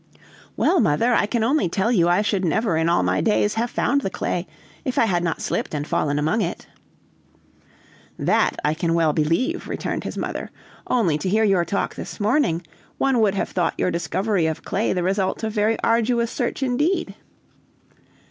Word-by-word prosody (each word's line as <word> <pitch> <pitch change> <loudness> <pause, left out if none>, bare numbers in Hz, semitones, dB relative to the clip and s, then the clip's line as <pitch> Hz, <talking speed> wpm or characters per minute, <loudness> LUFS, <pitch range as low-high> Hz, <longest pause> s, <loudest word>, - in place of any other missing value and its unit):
"Well, 370 - +3
mother, 230 - +2
I 210 - +2
can 230 0 0
only 260 - +2
tell 195 +6 0
you 175 -7 +3
I 180 +4 +3
should 200 -3 0
never 195 +2 +1
in 160 +1 +1
all 170 - +2
my - - +1
days 210 -1 +2
have 230 +2 -1
found 280 +3 +1
the 195 - -2
clay, 180 -1 -3 0.4
if 255 - -3
I - - +5
had 175 -5 0
not 165 -2 -2
slipped - - -2
and 145 0 -2
fallen 145 -1 0
among 155 +10 +1
it." 175 - -3 1.5
"That - - +1
I 150 - +2
can 165 +1 -1
well 160 -3 +2
believe," 165 - 0
returned - - -3
his - - -6
mother; - - -4 0.4
"only, 180 -12 +1
to 185 - -2
hear 220 +3 +2
your 195 -5 +3
talk 200 +4 -2
this - - -8
morning, 210 - +1 0.3
one 270 -3 +2
would 210 -3 +2
have - - -1
thought 175 -2 -1
your 180 - 0
discovery 175 +2 0
of 160 - -4
clay 210 +4 -1
the 180 -2 0
result 190 +3 -1
of 220 -1 -2
very 215 +1 +1
arduous 235 +1 +2
search 250 +1 -2
indeed." 290 +9 0
200 Hz, 185 wpm, -22 LUFS, 170-230 Hz, 1.5 s, I